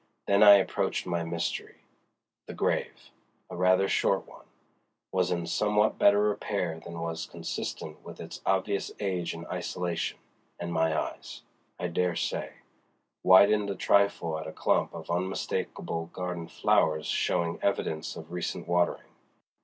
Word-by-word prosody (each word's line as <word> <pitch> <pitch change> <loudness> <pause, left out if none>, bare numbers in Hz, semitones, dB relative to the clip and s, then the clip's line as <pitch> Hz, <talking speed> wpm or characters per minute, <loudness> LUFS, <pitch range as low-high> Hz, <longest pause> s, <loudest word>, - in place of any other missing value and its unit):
Then 100 0 +3
I 105 -1 +11
approached 95 - 0
my 85 -2 -1
mystery. 85 0 -3 0.7
The - - -7
grave—a - - -4
rather 95 +2 +3
short - - +1
one—was 90 -1 -6
in 85 -2 -1
somewhat 105 +4 +1
better 100 0 +5
repair 80 -5 -2
than 85 0 -8
was 85 -1 -3
consistent 75 0 -5
with - - -10
its - - -8
obvious 95 +1 0
age 90 -5 -2
and 85 +1 -8
isolation, 90 -1 -3 0.4
and 85 0 -4
my 80 -1 +2
eyes, - - -6 0.4
I 90 - -1
dare 90 0 0
say, - - -2 0.7
widened 100 +2 +6
a 100 - -2
trifle 90 -6 +2
at 80 - -6
a - - -5
clump - - +1
of - - -6
unmistakable 85 -2 -2
garden 90 -1 -5
flowers 80 0 +2
showing 85 -2 0
evidence 80 -5 -1
of - - -10
recent 90 -1 -4
watering. 85 0 +1
90 Hz, 135 wpm, -29 LUFS, 85-95 Hz, 0.7 s, I